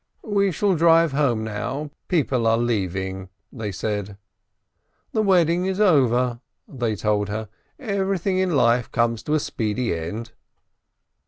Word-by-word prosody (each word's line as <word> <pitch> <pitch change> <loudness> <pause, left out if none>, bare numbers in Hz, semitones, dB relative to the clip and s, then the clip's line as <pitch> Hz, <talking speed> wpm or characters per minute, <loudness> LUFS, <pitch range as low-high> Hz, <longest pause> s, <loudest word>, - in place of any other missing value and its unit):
"We 200 -3 +1
shall 190 +3 +1
drive 165 -1 +4
home 135 -6 +1
now, 135 +7 -4 0.2
people 135 -9 +1
are 115 0 +4
leaving," 95 -5 -2 0.2
they 110 -4 -4
said. 100 0 -4 0.9
"The 220 - +1
wedding 180 -3 +3
is 190 +1 -2
over," 125 - +3 0.3
they 120 -5 -2
told 105 0 0
her, 110 0 -4 0.3
"everything 195 - -1
in 185 -4 +1
life 120 -2 +2
comes 115 -1 +1
to 150 - -1
a - - +3
speedy 115 -3 -2
end." 105 +8 -5
125 Hz, 135 wpm, -23 LUFS, 110-170 Hz, 0.9 s, drive